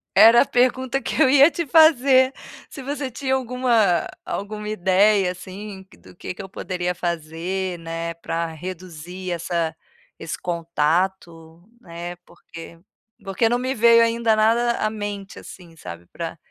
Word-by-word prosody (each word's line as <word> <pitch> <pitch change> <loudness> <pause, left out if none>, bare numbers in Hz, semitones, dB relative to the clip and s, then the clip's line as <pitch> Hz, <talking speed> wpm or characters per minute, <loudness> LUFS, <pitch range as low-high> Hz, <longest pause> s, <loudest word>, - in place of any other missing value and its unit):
Era 225 +4 +8
a - - +3
pergunta 255 +1 +1
que - - -2
eu 260 - +6
ia 285 +3 +7
te 340 - -3
fazer, 270 -4 +5 0.4
se 275 - -9
você 275 0 -4
tinha 265 +2 -1
alguma 240 -8 +1 0.2
alguma 210 +1 -5
ideia 195 0 +3
assim, 190 +2 -9
que - - -19
do - - -18
que 180 - -7
que - - -9
eu 190 - -10
poderia 180 -1 -4
fazer, 175 +2 -3
né, 165 0 -5
para 165 0 -3
reduzir 180 +1 -8
essa 170 -1 -2 0.4
esse 165 0 -5
contato, 170 0 -2 0.2
né, 175 -2 -8
porque 165 0 -13 0.4
porque 195 +4 0
não 240 - +1
me 255 +1 -2
veio 230 +1 +6
ainda 230 -1 +1
nada 230 +2 +2
à 215 - 0
mente 205 -2 -6
assim, 170 -3 -13
sabe, 85 - -10
pra 165 - -7
190 Hz, 150 wpm, -22 LUFS, 170-235 Hz, 0.4 s, Era